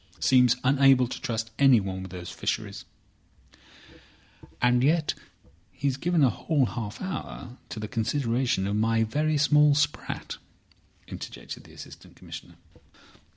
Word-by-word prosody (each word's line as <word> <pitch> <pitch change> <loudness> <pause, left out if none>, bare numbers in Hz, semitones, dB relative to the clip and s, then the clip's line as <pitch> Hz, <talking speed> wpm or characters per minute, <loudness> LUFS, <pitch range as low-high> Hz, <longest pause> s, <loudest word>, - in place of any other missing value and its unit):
Seems 125 -2 +4
unable 135 -1 +5
to - - -7
trust 115 -1 -3
anyone 105 -9 +4
with 95 -1 -8
these 90 -1 -7
Fisheries." - - -4 1.7
"And 125 0 +3
yet 155 +2 +2 0.6
he's 140 -1 -1
given 165 +2 +1
a 130 - +5
whole 150 -5 0
half 105 0 -5
hour 155 -8 -6
to 110 - -6
the 105 - -4
consideration 120 -2 0
of 100 +1 -1
my 115 +1 +2
very 150 +7 0
small 150 0 +5
sprat," 150 0 -2 0.7
interjected - - -8
the - - -16
Assistant - - -12
Commissioner. - - -11
125 Hz, 125 wpm, -27 LUFS, 110-145 Hz, 1.7 s, unable